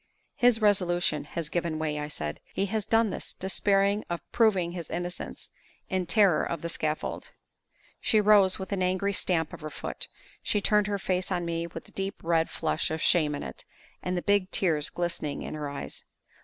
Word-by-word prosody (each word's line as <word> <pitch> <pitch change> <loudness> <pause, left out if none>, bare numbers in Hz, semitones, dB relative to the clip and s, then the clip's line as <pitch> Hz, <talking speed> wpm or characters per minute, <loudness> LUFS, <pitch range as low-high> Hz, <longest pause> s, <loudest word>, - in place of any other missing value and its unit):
"His 240 -3 +3
resolution 175 -7 +2
has 165 +1 -3
given 165 0 -1
way," 155 -1 -1
I 150 - -3
said. 75 - -4 0.2
"He 195 - +1
has 215 +1 -2
done 225 -2 +3
this, - - -5
despairing 200 +2 +2
of 170 -1 -2
proving 195 -7 +3
his 175 -2 -6
innocence, 175 +1 -5 0.4
in 185 -2 0
terror 185 -1 +4
of 165 -2 -3
the 170 - -2
scaffold." 155 -2 -2 0.7
She 215 - +3
rose, 205 -2 +5
with 190 - -6
an 195 -2 0
angry 185 +2 +1
stamp 165 -5 0
of - - -8
her 155 - -5
foot. 145 - -5 0.3
She 210 - +1
turned 210 0 +3
her 205 -1 0
face 185 -1 -1
on 175 -1 0
me 170 0 -2
with 170 - -8
the - - -18
deep 195 0 -3
red 165 -1 +2
flush 160 - -1
of 160 - -2
shame 155 -3 +3
in - - -5
it, 65 -1 -8 0.4
and 180 0 -2
the 175 - -2
big 200 -2 +2
tears 160 -7 +1
glistening 170 -4 -3
in - - -5
her 150 -2 -4
eyes. 140 - -6
175 Hz, 195 wpm, -28 LUFS, 160-200 Hz, 0.7 s, rose